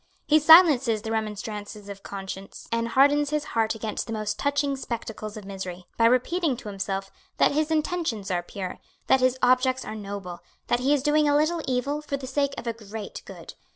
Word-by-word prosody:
He 310 +1 +5
silences 290 - +7
the 225 - -4
remonstrances 210 -1 -4
of 200 -1 -8
conscience, 195 0 -8
and 230 0 0
hardens 285 +3 +4
his 300 0 -1
heart 225 -1 +1
against 220 +1 -4
the 225 - -4
most 215 -1 -3
touching 285 0 +1
spectacles 225 -4 -6
of 210 - -9
misery, 185 -2 -7
by 230 - +3
repeating 265 +4 +1
to 230 -3 -8
himself 195 0 -4 0.3
that - - +4
his 305 +2 0
intentions 310 - -1
are 175 -1 +1
pure, 185 +1 -6 0.3
that 265 - +4
his 255 0 +2
objects 255 +1 +3
are - - -5
noble, 200 -4 -6 0.3
that 240 - +2
he 265 +3 +1
is 290 -3 +2
doing 295 0 +3
a 290 - +4
little 320 +3 +1
evil 265 +4 -1
for 290 -2 -3
the 270 - -7
sake 280 +1 -1
of - - -6
a 230 - -1
great 220 -1 -8
good. - - -10
235 Hz, 195 wpm, -26 LUFS, 210-285 Hz, 0.3 s, silences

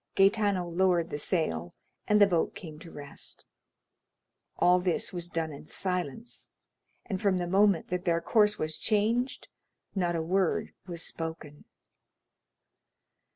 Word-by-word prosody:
Gaetano 195 -2 +3
lowered 175 -1 +2
the 145 - -3
sail, 85 - -1 0.3
and 210 -1 +5
the 205 - +9
boat 175 -4 +1
came 155 -4 -9
to 165 - -11
rest. 145 -2 -9 1.1
All 180 +1 +5
this 180 0 0
was 175 -1 -4
done 165 -2 -2
in 140 - -11
silence, 180 - -3 0.6
and 190 -4 -3
from 195 -3 +3
the 175 - -1
moment 195 0 +3
that 180 0 -2
their 170 -2 +3
course 210 +2 +3
was 155 0 -3
changed 230 +4 +1 0.5
not 175 -3 0
a 165 - 0
word 185 +1 +1
was 170 -2 -4
spoken. 160 -3 -6
180 Hz, 135 wpm, -29 LUFS, 165-195 Hz, 1.1 s, the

